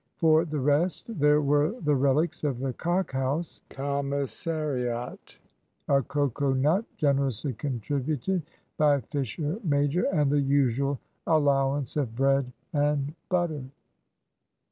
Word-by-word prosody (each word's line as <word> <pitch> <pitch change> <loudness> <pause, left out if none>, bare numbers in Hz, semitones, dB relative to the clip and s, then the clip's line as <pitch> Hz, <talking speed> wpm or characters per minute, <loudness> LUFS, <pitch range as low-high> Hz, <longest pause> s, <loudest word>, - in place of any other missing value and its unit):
For 160 0 +4
the 155 -2 -3
rest, 160 - 0
there 150 +1 +5
were 145 - +2
the 150 -2 +1
relics 140 +5 +1
of 140 -5 0
the 130 0 -2
"Cock 175 +5 -1
House" 135 +5 -2
commissariat, 140 -2 -3 0.5
a 140 -1 +4
cocoa 140 0 0
nut, 155 +11 +2
generously 140 -2 0
contributed 140 - -2 0.4
by 145 -3 +4
Fisher 145 - -3
major, 145 +1 +1
and 150 -6 +2
the 145 0 +3
usual 140 0 +1 0.3
allowance 140 -3 +2
of 125 -6 -1
bread 135 0 +2 0.2
and 145 -1 +1 0.2
butter. 175 -5 0
145 Hz, 115 wpm, -27 LUFS, 135-155 Hz, 0.5 s, there